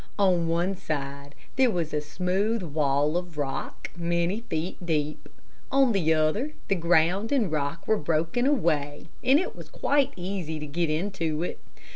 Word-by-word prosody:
On 180 -4 +3
one 175 +4 +1
side 140 -3 -5 0.2
there 260 -2 +5
was 170 -7 -2
a 150 - +1
smooth 185 +8 0
wall 150 0 +1
of 175 -3 -5
rock, 140 -2 -4
many 170 +3 0
feet 165 +3 -3
deep. 150 -3 -2 0.4
On 270 -2 +5
the 175 -7 +2
other 160 - +1 0.2
the - - +4
ground 175 +4 +2
and 235 - +2
rock 150 +2 -2
were 220 - +3
broken 165 - +1
away, 155 - 0
and 265 +3 +6
it 370 - -3
was - - -10
quite 280 -1 +1
easy 180 -3 -4
to 150 - -5
get 165 +3 -1
into 165 -1 -1
it. - - -4
170 Hz, 160 wpm, -27 LUFS, 155-195 Hz, 0.4 s, and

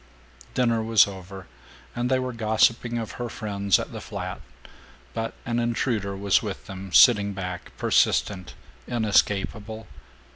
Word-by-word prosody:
Dinner 115 -3 +2
was 110 -1 +5
over 95 -1 -9 0.5
and 120 +1 -1
they 130 - +3
were 130 -1 -3
gossiping 115 +1 +2
of 115 -2 -4
her 120 - -3
friends 100 -4 0
at - - -5
the - - -7
flat, - - -6 0.7
but 115 0 -3
an 120 0 -1
intruder 115 -4 -1
was 100 0 +2
with - - -6
them, 95 0 -8
sitting 100 -2 +6
back, 90 -2 -6
persistent, 95 -3 +1 0.3
inescapable. 110 -1 0
110 Hz, 135 wpm, -25 LUFS, 100-115 Hz, 0.7 s, sitting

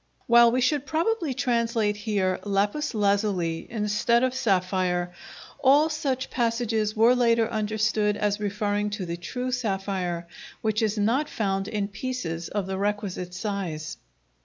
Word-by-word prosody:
While 235 0 +6
we 255 +2 +1
should 290 +2 +1
probably 325 - 0
translate 230 -5 +1
here 205 -3 -1
"lapis 205 +8 0
lazuli" 200 -5 0
instead 220 +2 +1
of 255 -1 +1
"sapphire," 185 -5 0 0.5
all 285 +4 +5
such 275 -4 -2
passages 230 -3 0
were 225 +3 +5
later 230 -2 +3
understood 215 -1 0
as 205 0 0
referring 205 0 -1
to 190 - -4
the 170 0 -3
true 250 +8 -4
sapphire, 195 -7 -2 0.3
which 215 0 0
is 215 -1 0
not 235 +9 +1
found 195 -2 -1
in 210 -2 -2
pieces 195 -7 -4
of 205 -2 -2
the 190 0 -3
requisite 200 -3 -2
size. 180 -6 -4
210 Hz, 135 wpm, -26 LUFS, 195-235 Hz, 0.5 s, While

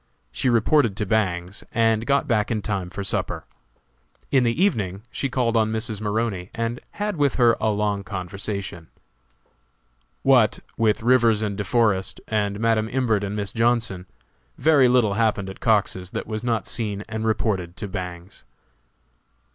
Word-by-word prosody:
She - - 0
reported 115 -2 +3
to 105 - -1
Bangs, 95 -3 -1
and 115 0 +2
got 140 0 +2
back 110 -3 +1
in 110 -3 -1
time 95 -4 -2
for 100 +2 -5
supper. 95 - -2 0.9
In 135 -2 +4
the 115 +4 0
evening 105 - 0
she 140 - -2
called 125 -2 0
on 110 -1 +2
Mrs. 110 -1 -3
Maroney 105 -3 -2
and 115 +1 -2
had 205 -3 -3
with 145 -2 +2
her 120 -2 +5
a 110 - +2
long 105 -1 0
conversation. 95 -2 -5 1.4
What, 125 -5 +4 0.2
with 110 -2 +1
Rivers 115 -3 +4
and 105 -2 -2
De 100 - -3
Forest, 100 -4 +1
and 105 -2 -1
Madam 110 -1 +1
Imbert 115 -5 +1
and 100 +1 -3
Miss 100 -2 -3
Johnson, 115 -6 0 0.5
very 150 -5 +5
little 120 -5 +3
happened 105 -3 0
at - - -13
Cox's 100 -5 +1
that - - -4
was 110 0 -4
not 115 -4 0
seen 105 -3 -2
and 110 0 -4
reported 100 -5 -1
to 105 - -4
Bangs. 90 -1 -7
110 Hz, 155 wpm, -23 LUFS, 100-115 Hz, 1.4 s, her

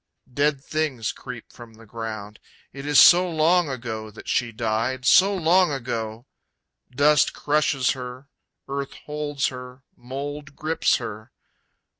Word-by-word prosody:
Dead 145 0 +1
things 145 -8 -2
creep - - -10
from 115 -2 -13
the 115 +1 -16
ground. 110 -2 -7 0.3
It 140 +1 -8
is 145 -1 +5
so 180 +1 +7
long 165 +1 +2
ago 115 -4 -5
that 105 - -13
she 120 -2 0
died, 115 +3 -2
so 195 +8 +6
long 180 0 +3
ago! 115 -3 -4 0.6
Dust 145 +3 +3
crushes 145 -3 +1
her, 125 +1 -7 0.4
earth 140 0 -4
holds 150 -2 -2
her, 125 0 -10
mold 140 +3 -7
grips 160 +1 +1
her. 110 -1 -7
135 Hz, 130 wpm, -24 LUFS, 115-150 Hz, 0.6 s, so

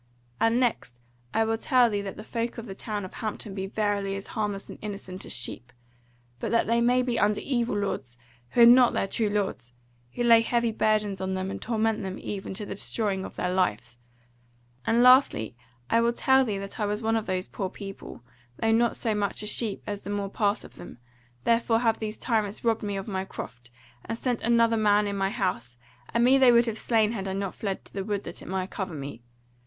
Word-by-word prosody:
And 225 +2 +3
next 220 - -1 0.3
I 225 - +2
will 225 0 -1
tell 250 -2 +4
thee 205 -3 -1
that 195 -1 -6
the 215 - -7
folk 230 +1 -3
of 230 - -6
the 195 - -7
town 205 0 -4
of 185 - -10
Hampton 215 -2 -5
be 190 0 -4
verily 205 -1 -1
as 195 - -6
harmless 205 -2 -2
and - - -10
innocent 195 -3 -6
as - - -7
sheep; 125 0 -3 0.7
but - - -3
that 230 - +2
they 235 +1 +2 0.2
be 245 -1 -1
under 210 0 +2
evil 240 -5 -1
lords 135 -12 -3 0.4
who 240 - +4
are - - +11
not 245 +1 +7
their - - +1
true 215 +1 0
lords, 195 - -2 0.4
who 240 - -1
lay 230 -1 +7
heavy 235 0 +1
burdens 210 -3 +1
on 190 0 -1
them 190 +1 -3
and - - -6
torment 225 -1 0
them 190 -1 -4
even 195 -1 -5
to 210 - -4
the - - -5
destroying 200 -2 -1
of - - -8
their 180 0 -1
lives: 120 - -1 0.9
and 235 +2 +4
lastly 250 - +5 0.3
I 230 - +3
will 235 0 +2
tell 265 +2 +4
thee 210 -4 -2
that 195 +3 -7
I 210 - +1
was 210 +2 -2
one 225 0 +2
of 220 -1 -1
those 185 0 -1
poor 190 -2 -4
people, 195 - -9 0.3
though 225 - +1
not 230 +1 +2
so 225 -3 0
much 205 0 -2
a - - -4
sheep 210 -1 0
as 205 -1 -4
the - - -8
more 200 -1 -2
part 205 -1 0
of - - -14
them, - - -10 0.5
therefore 230 0 +3
have 225 -1 +1
these 215 -1 -4
tyrants 215 -4 -1
robbed 225 -1 +1
me 205 -1 -3
of 195 - -5
my 190 -3 -2
croft, 120 -9 -9 0.3
and 230 - -4
set 245 -1 -1
another 230 0 +3
man 210 -1 +3
in 200 0 -2
my 195 -1 0
house; 120 - -2 0.3
and 235 +1 +2
me 260 +2 +5
they 260 -2 +7
would 235 0 +5
have 225 -2 -3
slain 220 -2 +2
had 195 -4 -4
I 190 - -2
not 195 -1 -3
fled 195 -3 -4
to - - -16
the 195 - -3
wood 205 0 -2
that 170 - -8
it - - -11
might 185 0 -3
cover 190 -4 -4
me. 140 -5 -7
210 Hz, 225 wpm, -27 LUFS, 195-230 Hz, 0.9 s, are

